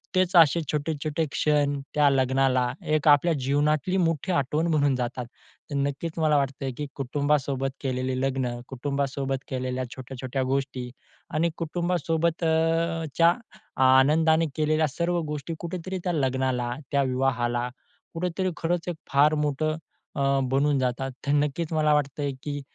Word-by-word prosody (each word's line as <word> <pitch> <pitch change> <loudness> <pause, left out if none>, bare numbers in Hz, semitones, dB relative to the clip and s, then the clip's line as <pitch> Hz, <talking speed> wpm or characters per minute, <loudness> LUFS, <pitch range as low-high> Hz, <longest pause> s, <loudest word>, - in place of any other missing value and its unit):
तेच 185 0 +2
असे 165 -1 +6
छोटे-छोटे 150 +1 -1
क्षण 145 -2 +1
त्या 150 -1 +4
लग्नाला 130 -2 +2 0.2
एक 155 0 0
आपल्या 145 +3 +6
जीवनातली 145 +6 +1
मोठी 165 0 0
आठवण 150 +1 +1
म्हणून 145 -4 +2
जातात. 125 0 -3 0.5
तर - - -2
नक्कीच 140 +4 -2
मला 155 -2 +3
वाटतं 135 0 -1
आहे, 135 - -2
की 150 - -3
कुटुंबासोबत 140 0 0
केलेले 130 -1 -1
लग्न, 135 -1 0 0.2
कुटुंबासोबत 135 0 -2
केलेल्या 130 0 -2
छोट्या-छोट्या 130 0 -4
गोष्टी 130 -1 -2 0.4
आणि 160 +3 +2
कुटुंबासोबतच्या 165 -1 +1 0.5
आनंदाने 155 +5 +5
केलेल्या 155 0 +2
सर्व 170 +5 -1
गोष्टी 150 +1 -4
कुठेतरी 180 +2 -4
त्या 180 - 0
लग्नाला, 130 -4 0 0.2
त्या 140 -1 +3
विवाहाला 125 -2 0 0.4
कुठेतरी 180 +2 -1
खरंच 170 +1 -1
एक 175 - -3 0.2
फार 145 +2 +5
मोठं 155 +2 0 0.4
अ, 140 0 +2
बनून 140 +1 +2
जातात. 130 +1 -1 0.2
तर - - +2
नक्कीच 150 +3 0
मला 155 -1 +3
वाटतं 145 0 0
आहे, 140 - 0
की 145 -1 -4
145 Hz, 135 wpm, -26 LUFS, 135-160 Hz, 0.5 s, असे